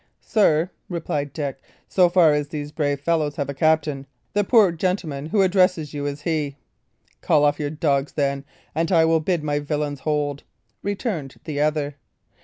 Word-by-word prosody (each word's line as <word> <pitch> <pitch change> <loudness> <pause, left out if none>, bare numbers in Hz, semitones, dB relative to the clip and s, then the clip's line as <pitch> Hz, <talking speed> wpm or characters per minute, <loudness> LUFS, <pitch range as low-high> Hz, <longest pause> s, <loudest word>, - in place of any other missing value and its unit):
"Sir," 180 -5 +3 0.2
replied 150 -5 -3
Dick, 140 -3 -4 0.3
"so 180 -2 +4
far 170 -4 +5
as 150 0 0
these 145 -1 -5
brave 145 -2 -1
fellows 155 -2 0
have 140 -2 -3
a - - -2
captain, 150 -2 +1 0.3
the 205 - +2
poor 210 -3 +5
gentleman 165 -5 -2
who 210 - -1
here 195 - +5
addresses 180 -5 +2
you 145 -1 -3
is 145 +1 -5
he." 150 -4 -1 0.7
"Call 150 -1 +3
off 145 0 +2
your 145 -1 -1
dogs, 145 -2 0
then, 140 -1 -1 0.3
and 165 +3 0
I 165 -3 +5
will 160 0 +3
bid 165 0 -1
my 145 -1 0
villains 145 -1 -2
hold," 145 -1 -1 0.4
returned 195 - -3
the 150 -3 -3
other. 150 -2 0
150 Hz, 175 wpm, -23 LUFS, 145-170 Hz, 0.7 s, far